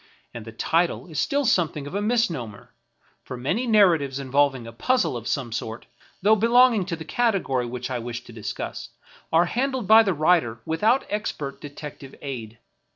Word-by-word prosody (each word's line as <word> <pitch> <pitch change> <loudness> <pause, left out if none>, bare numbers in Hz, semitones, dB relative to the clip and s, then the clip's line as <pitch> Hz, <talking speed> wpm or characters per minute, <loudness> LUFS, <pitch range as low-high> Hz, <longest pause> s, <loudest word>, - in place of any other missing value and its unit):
And 115 -2 -8
the 115 - -8
title 165 +9 0
is 160 -5 -5
still 285 - +1
something 160 - +1
of 145 - -8
a 200 - -1
misnomer, 170 - -2 0.5
for 125 - -7
many 180 - -1
nar 215 -3 +6
ratives 140 -7 0
involving 135 -2 +1
a 115 - -8
puzzle 250 - 0
of 120 -1 -6
some 130 -5 -2
sort, 110 +1 -5 0.4
though 215 +2 +6
belonging 230 -2 +4
to 175 - -2
the 160 -1 -9
category 180 - 0
which 125 +1 -5
I 125 - -2
wish 120 +1 -6
to 120 - -13
discuss, 110 -2 -6 0.4
are 165 +2 +4
handled 255 +4 -1
by 220 +3 +8
the 195 -5 0
writer 155 -7 +2
without 215 +11 +2
expert 150 -9 -4
detective 145 -2 -9
aid. 115 -5 -7
155 Hz, 175 wpm, -24 LUFS, 125-210 Hz, 0.5 s, by